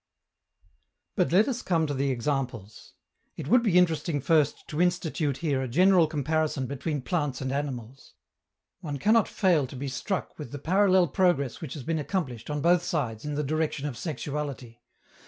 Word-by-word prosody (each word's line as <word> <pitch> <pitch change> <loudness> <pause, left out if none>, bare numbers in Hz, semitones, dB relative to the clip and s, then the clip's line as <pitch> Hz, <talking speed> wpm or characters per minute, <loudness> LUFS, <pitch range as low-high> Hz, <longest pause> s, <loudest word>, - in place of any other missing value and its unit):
But 180 -5 +1
let 195 +5 +5
us 250 -3 -2
come 165 -3 +1
to 145 - -2
the 140 0 0
examples. 125 -5 -3 0.4
It - - -6
would 250 +9 +5
be 205 -7 +2
interesting 165 -3 +2
first 150 +1 +1
to 155 +2 -1
institute 165 -5 0
here 140 -4 +1
a 130 - -2
general 180 +5 +4
comparison 155 -2 -1
between 140 +1 -3
plants 145 -6 -1
and 130 0 -3
animals. 135 -3 -5 0.6
One 150 -6 -5
cannot 220 - +3
fail 175 -9 +2
to 130 - -10
be 135 +2 -4
struck 180 +10 -4
with 145 -6 -7
the 145 - -5
parallel 185 +4 +3
progress 170 - +1
which 155 -3 -6
has 145 - -7
been 160 +2 -1
accomplished, 145 - -3
on 150 -1 -2
both 175 +2 +4
sides, 125 -10 -3
in 150 -1 -3
the 150 - -1
direction 155 0 -1
of 145 -4 -3
sexuality. 140 -5 -5
150 Hz, 175 wpm, -27 LUFS, 135-175 Hz, 0.6 s, let